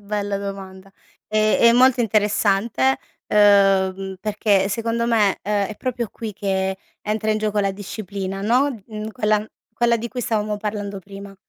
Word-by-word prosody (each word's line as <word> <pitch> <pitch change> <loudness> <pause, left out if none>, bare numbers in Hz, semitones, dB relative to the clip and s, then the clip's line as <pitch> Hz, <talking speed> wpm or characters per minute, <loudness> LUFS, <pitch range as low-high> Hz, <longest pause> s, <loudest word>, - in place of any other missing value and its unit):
Bella 205 -1 -2
domanda. 195 -1 -7 0.4
È 215 0 +2
è 235 0 +7
molto 255 +1 +5
interessante, 205 - +1 0.3
uhm, 195 -2 +3
perché 205 -2 +1
secondo 230 +2 -1
me, 215 -4 +2
ehm, 205 -1 0
è 215 - -8
proprio 245 -3 -3
qui 220 -2 -6
che 190 -1 -1 0.3
entra 215 +1 -1
in 215 - +1
gioco 215 -1 -1
la 195 -1 +1
disciplina, 195 -1 -6
no, 245 0 +1
mhmm, 215 -1 -6
quella 215 -2 0 0.3
quella 235 +1 +2
di 235 +1 -5
cui 250 0 -5
stavamo 215 -2 -1
parlando 205 -1 -4
prima. 195 +1 -11
210 Hz, 150 wpm, -21 LUFS, 195-220 Hz, 0.4 s, è